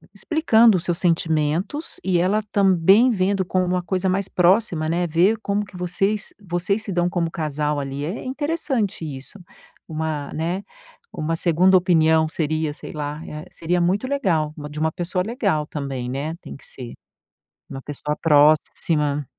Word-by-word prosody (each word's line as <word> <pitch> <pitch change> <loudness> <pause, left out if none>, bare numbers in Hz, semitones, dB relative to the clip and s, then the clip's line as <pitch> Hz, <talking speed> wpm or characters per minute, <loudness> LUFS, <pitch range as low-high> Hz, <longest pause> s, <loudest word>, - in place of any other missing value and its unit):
explicando 235 - +4
os 175 - -5
seus 175 -1 0
sentimentos 165 - 0
e 185 -2 +2
ela 195 +5 +2
também 195 +5 +5
vendo 195 -2 +1
com 185 +1 0
uma 180 0 -1
coisa 185 +1 -1
mais 195 +1 0
próxima, 180 -3 +2
né, 175 +2 0
vê 175 +7 +3
como 205 0 -1
que 200 - -16
vocês 195 +4 -1
vocês 185 +3 -1
se 205 - -5
dão 175 0 +1
como 175 -2 -1
casal 150 -2 -2
ali 140 +1 -4
é 180 +9 -5
interessante 270 - -2
isso, 140 +5 -8 0.5
uma 155 -2 -3
né, 170 +5 -2 0.5
uma 160 +2 -2
segunda 175 +3 +3
opinião, 160 -3 +3
seria 155 -1 -1
sei - - -10
lá, 150 0 -5
eh, 150 0 -7
seria 175 +2 -1
muito 195 +8 +1
legal, 170 - 0
uma 150 -1 -7
de 150 +1 -7
uma 160 +1 +2
pessoa 180 +2 -2
legal 200 - -1
também, 135 -5 -4
né, 140 +5 -3
tem - - -9
que - - -18
ser, 125 -2 -9 0.8
uma 135 - -6
pessoa 150 +1 -4
próxima. 150 -1 +3
170 Hz, 160 wpm, -22 LUFS, 155-195 Hz, 0.8 s, também